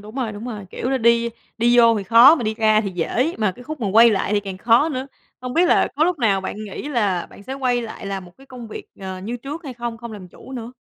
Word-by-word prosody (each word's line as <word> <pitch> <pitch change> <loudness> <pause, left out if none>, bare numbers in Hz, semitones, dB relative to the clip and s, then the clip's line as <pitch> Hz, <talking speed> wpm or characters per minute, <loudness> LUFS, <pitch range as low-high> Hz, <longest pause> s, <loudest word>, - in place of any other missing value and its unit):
đúng 215 +3 -12
rồi, 245 -5 -2
đúng 205 +3 -8
rồi, 210 -6 -6
kiểu 255 - -3
là, 265 - +1
đi 235 0 +3 0.3
đi 240 +1 +3
vô 230 -2 +6
thì 195 - -5
khó 235 - +8
mà 265 - -4
đi 215 0 -1
ra 215 -1 +3
thì 200 -3 -3
dễ, 245 - -1
mà 210 -4 +1
cái 245 - -14
khúc 305 +1 -7
mà 205 - -1
quay 230 +3 +7
lại 200 0 -1
thì 205 - +2
càng 195 -2 -7
khó 235 +9 +4
nữa. 265 -2 -4 0.3
Hông 250 0 -6
biết 350 +2 +4
là - - +3
có 310 - +3
lúc 350 -3 0
nào 200 -5 +2
bạn 210 +3 -6
nghĩ 210 +8 -7
là 205 -10 0
bạn - - -15
sẽ 260 - -7
quay 250 -3 0
lại 220 -3 -8
làm 195 -1 -4
một 175 - -15
cái 270 - -17
công 245 -4 -10
việc, - - -8 0.2
ờ, 190 -1 -6
như 220 +6 -5
trước 290 +7 -8
hay 265 -4 -7
không? 235 -1 -5
Không 235 -1 -8
làm 190 -4 -10
chủ 265 - -14
nữa? 240 -1 -7
230 Hz, 295 wpm, -21 LUFS, 205-255 Hz, 0.3 s, khó